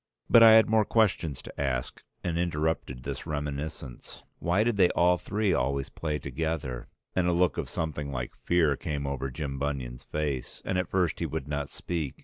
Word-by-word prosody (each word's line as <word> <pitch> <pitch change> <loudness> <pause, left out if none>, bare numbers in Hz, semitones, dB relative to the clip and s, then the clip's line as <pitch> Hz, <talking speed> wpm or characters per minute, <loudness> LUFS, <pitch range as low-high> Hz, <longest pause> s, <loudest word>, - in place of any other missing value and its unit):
But 115 - +9
I 115 -1 +10
had 110 0 +7
more 110 -1 +4
questions 95 - +1
to - - -7
ask 65 -3 -2 0.2
and 85 - -1
interrupted 80 -6 -1
this - - -5
reminiscence. 75 -3 -5 0.2
Why 90 +5 +2
did 120 -1 +1
they 90 -3 +6
all 90 0 +4
three 105 +1 0
always 70 +2 0
play 75 -2 -3
together? 70 -3 -3 0.3
And 90 -1 +2
a - - +3
look 90 +1 +3
of - - -3
something 75 -3 -3
like - - -4
fear 80 -5 +2
came 70 0 -3
over 70 -1 -2
Jim 70 +1 -4
Bunion's 65 -3 -3
face; 75 -4 -3
and 95 - 0
at 90 - -2
first 90 -3 +1
he - - -1
would - - -4
not 75 -1 -2
speak. 80 -6 -4
75 Hz, 185 wpm, -28 LUFS, 70-90 Hz, 0.3 s, I